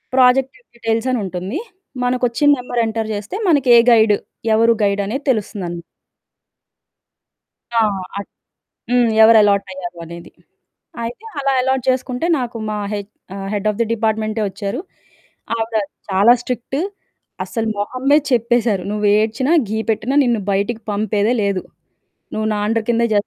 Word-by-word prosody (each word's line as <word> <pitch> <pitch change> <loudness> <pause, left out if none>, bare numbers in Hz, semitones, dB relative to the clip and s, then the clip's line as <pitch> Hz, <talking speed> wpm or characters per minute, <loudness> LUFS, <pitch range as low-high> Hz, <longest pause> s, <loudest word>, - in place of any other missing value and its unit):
Project 260 +1 +4 0.2
details 225 +1 -1
అని 250 - 0
ఉంటుంది. 185 - -4 0.5
మనకు 250 0 +1
ఒచ్చిన 290 +5 +2
నెంబర్ 245 -1 -2
ఎంటర్ 220 0 -2
జేస్తే, 205 - -5
మనకే 270 -7 +5
గైడ్? 220 -2 +5 0.4
ఎవరు 230 +1 +4
గైడ్? 200 0 +1
అనేది 270 +7 -4
తెలుస్తుందని. 190 -6 -4 1.9
ఆ! - - +6 0.4
అట్ 200 - -8 0.6
హ్మ్. 245 -2 +4
ఎవరు 225 0 +8
అలాటయ్యారు 190 -3 -1
అనేది. 170 +1 -10 0.7
అయితే, 240 - -6 0.2
అలా 275 -1 +1
అలాట్ 265 0 0
జేసుకుంటే 255 +2 0
నాకు 240 -2 -4
మా 210 - -2 0.2
హెచ్ 205 0 -5 0.2
ఆ! - - -6 0.2
హెడ్ 205 0 -1
ఆఫ్ 210 - -3
ది - - +2
డిపార్ట్‌మెంటే 220 0 -1
ఒచ్చారు. 200 +5 -4 0.8
ఆవిడ 225 -1 -1 0.3
చాలా 200 +5 +5
స్ట్రిక్ట్. 250 +2 -3 0.6
అస్సలు 225 -2 -3
మొహం 250 +5 -4
మీద 300 +1 +6
చెప్పేశారు 235 -4 +2
నువ్వేడ్చినా, 215 +6 +1 0.2
ఘీ 220 - -1
పెట్టినా 225 +5 0
నిన్ను 235 -4 +1
బయటికి 205 +4 -1
పంపేదే 210 +2 +1
లేదు. 200 -2 0 0.7
నువ్వు 215 0 -1
నా - - -2
అండర్ 225 0 0
కిందే 235 0 +2
జేయిలి. 205 0 +2
225 Hz, 135 wpm, -19 LUFS, 205-245 Hz, 1.9 s, ఎవరు